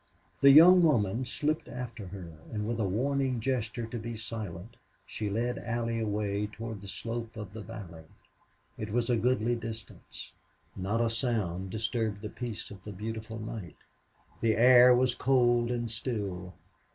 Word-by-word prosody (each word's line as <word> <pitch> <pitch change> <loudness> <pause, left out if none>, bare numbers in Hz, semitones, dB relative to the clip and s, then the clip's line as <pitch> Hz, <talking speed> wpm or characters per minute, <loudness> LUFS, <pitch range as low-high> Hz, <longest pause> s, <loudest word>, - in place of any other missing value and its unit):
The 140 - +7
young 175 +6 +9
woman 120 - +2
slipped 150 +5 -1
after 120 -5 -6
her, 90 -3 -8 0.2
and 105 -1 -3
with 115 0 -2
a 105 - +1
warning 130 +4 0
gesture 120 -1 -2
to 115 +1 -5
be 115 +1 -5
silent 110 -2 -6 0.3
she 105 -1 -4
led 120 +4 -1
Allie 115 0 -2
away 105 -1 -1
toward 110 -1 -7
the 100 - -10
slope 115 +2 -5
of 105 -3 -7
the 110 - -7
valley. 95 -8 -9 0.7
It 110 - -4
was 120 +2 +1
a - - +4
goodly 120 0 +1
distance. 115 -2 -8 0.4
Not 100 +5 -1
a 115 -1 +2
sound 105 -7 -1
disturbed 110 0 -2
the 105 - -4
peace 120 -2 -6
of 95 -3 -11
the 105 - -7
beautiful 110 +3 -5
night. 110 -4 -7 0.6
The 110 -1 +2
air 125 +1 +8
was 125 0 +3
cold 120 -2 +3
and 120 -2 -2
still. 100 -6 -4
115 Hz, 160 wpm, -30 LUFS, 105-120 Hz, 0.7 s, young